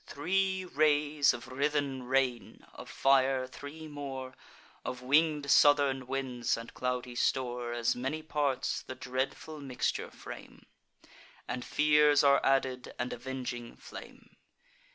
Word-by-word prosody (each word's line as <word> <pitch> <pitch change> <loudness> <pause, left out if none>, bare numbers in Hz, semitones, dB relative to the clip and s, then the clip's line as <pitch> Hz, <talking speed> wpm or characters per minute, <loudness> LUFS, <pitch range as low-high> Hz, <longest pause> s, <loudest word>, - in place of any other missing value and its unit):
Three 190 +5 0
rays 150 -2 +3
of 120 0 -7
writhen 140 0 -1
rain, 125 -5 -1
of - - -10
fire 135 -1 +3
three 145 +4 -9
more, 135 -3 -6 0.5
Of 125 0 -5
winged 145 +1 +3
southern 140 -3 +5
winds 130 -3 -1
and 115 0 -9
cloudy 125 -1 -3
store 120 -1 -1
As 120 -1 +1
many 135 +6 -3
parts, 145 -4 -1
the 130 - -8
dreadful 130 +4 -4
mixture 130 -3 -2
frame; - - -11 0.8
And 125 +1 -3
fears 150 -1 +4
are 140 -1 +5
added, 130 -2 0
and 120 +1 -2
avenging 120 -1 -5
flame. - - -12
135 Hz, 120 wpm, -31 LUFS, 125-145 Hz, 0.8 s, southern